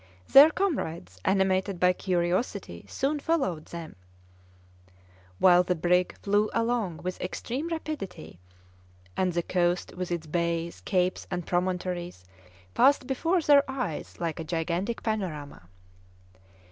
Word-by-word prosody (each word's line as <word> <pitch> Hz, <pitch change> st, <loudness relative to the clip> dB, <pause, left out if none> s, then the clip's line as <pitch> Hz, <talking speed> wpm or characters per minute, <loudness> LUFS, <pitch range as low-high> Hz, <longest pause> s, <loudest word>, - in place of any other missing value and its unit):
Their 285 Hz, +3 st, +9 dB
comrades, 165 Hz, -, -3 dB
animated 190 Hz, -1 st, +1 dB
by 180 Hz, 0 st, +4 dB
curiosity, 180 Hz, -, -2 dB
soon 285 Hz, -, -1 dB
followed 270 Hz, -, -1 dB
them; 165 Hz, -6 st, -8 dB, 1.4 s
while 180 Hz, -, +6 dB
the 180 Hz, 0 st, 0 dB
brig 180 Hz, +2 st, +1 dB
flew 205 Hz, +1 st, +2 dB
along 230 Hz, -7 st, -1 dB
with 185 Hz, 0 st, -4 dB
extreme 250 Hz, -, -4 dB
rapidity, 290 Hz, -, -6 dB, 0.8 s
and 185 Hz, -1 st, +1 dB
the 170 Hz, 0 st, 0 dB
coast 175 Hz, 0 st, 0 dB
with 180 Hz, 0 st, -4 dB
its 170 Hz, -2 st, -2 dB
bays, 170 Hz, +1 st, -2 dB
capes, 185 Hz, -2 st, 0 dB
and 180 Hz, -2 st, -3 dB
promontories 180 Hz, -, -2 dB, 0.5 s
passed 275 Hz, 0 st, +4 dB
before 325 Hz, +7 st, +1 dB
their 285 Hz, -1 st, +6 dB
eyes 255 Hz, -, -4 dB
like 170 Hz, -1 st, -3 dB
a -, -, -3 dB
gigantic 170 Hz, +7 st, -2 dB
panorama. 155 Hz, -, -4 dB
180 Hz, 120 wpm, -27 LUFS, 170-230 Hz, 1.4 s, Their